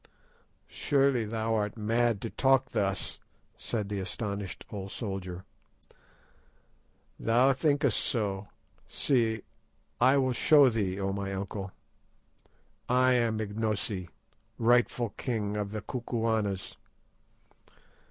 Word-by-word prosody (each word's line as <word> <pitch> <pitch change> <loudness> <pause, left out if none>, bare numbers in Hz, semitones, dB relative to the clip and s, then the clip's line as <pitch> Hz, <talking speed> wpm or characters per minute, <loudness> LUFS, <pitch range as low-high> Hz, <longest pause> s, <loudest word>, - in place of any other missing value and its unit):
"Surely 135 -4 +2
thou 110 +1 -1
art 105 0 -1
mad 115 0 +1
to 115 - -4
talk 135 -1 +3
thus," 95 -1 -1 0.4
said 105 -4 -3
the 100 -1 -3
astonished 100 -1 -4
old 100 -2 -5
soldier. 95 -4 -5 1.7
"Thou 125 +4 +4
thinkest 140 -3 +2
so; 100 -3 0 0.4
see, 115 -5 +1 0.6
I 130 +3 +5
will 130 -2 +2
show 145 +2 +6
thee, 100 -4 -1
O 95 0 -1
my 100 0 -3
uncle. 100 0 -5 1.2
"_I 130 +1 +4
am 115 -3 +1
Ignosi, 105 -3 -2 0.5
rightful 120 0 +3
king 105 -5 -2
of 105 -1 -3
the 105 -2 -5
Kukuanas! 110 -5 -2
110 Hz, 105 wpm, -29 LUFS, 100-125 Hz, 1.7 s, show